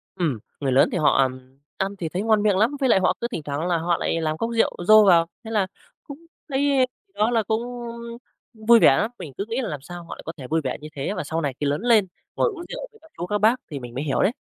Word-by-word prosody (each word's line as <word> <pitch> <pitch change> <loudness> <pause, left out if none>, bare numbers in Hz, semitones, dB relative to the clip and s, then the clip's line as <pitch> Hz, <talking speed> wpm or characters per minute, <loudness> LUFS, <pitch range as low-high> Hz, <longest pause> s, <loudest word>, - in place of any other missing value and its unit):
Ừm, 150 -11 -1 0.2
người 135 -2 -1
lớn 130 - +5
thì - - -1
họ 155 - +3 0.6
ăn 195 +1 -1
thì 165 -2 -3
thấy 185 +4 -2
ngon 215 -1 +2
miệng 200 -3 +3
lắm 220 +6 +3
với 265 -2 +2
lại 190 - +5
họ 185 - +2
cứ 235 - 0
thỉnh 155 - -4
thoảng 145 +4 -3
là 175 -2 +2
họ 170 +1 0
lại 165 - -1
làm 155 0 -1
cốc 230 - -2
rượu - - +3
dô 215 0 +8
vào, 170 -2 +6 0.2
thế 225 - -8
là, 210 -2 +2
ưm, 190 - -1 0.4
cũng 285 -1 -9 0.3
thấy 270 -1 +2 0.3
đó 215 +3 +1
là 225 -2 +2
cũng, 220 +3 -1 0.9
ưm, 220 -1 -15
vui 235 -1 +8
vẻ 135 - +6
lắm. 220 +3 0
Mình 140 -5 -8
cứ 200 - -2
nghĩ 235 +3 -2
là 230 - -3
làm 145 -3 -5
sao 175 +3 -9
họ - - -8
lại - - -12
có 165 - -4
thể 130 -3 -8
vui 160 +1 +1
vẻ - - -2
như 155 - -7
thế, 140 +9 -2
và - - -3
sau 160 +3 -2
này 140 -3 -1
khi 145 - -1
lớn 145 +6 0
lên 225 -5 +4 0.3
ngồi - - +2
uống 345 -4 -8
rượu - - -6
với 440 - -21
các 320 0 -20
chú, 175 - -3
các 210 +3 -1
bác 220 +4 +4 0.2
thì 140 - -4
mình 120 -1 -9
mới 140 - -2
hiểu 140 - 0
đấy. 200 - +3
190 Hz, 290 wpm, -23 LUFS, 155-225 Hz, 0.9 s, dô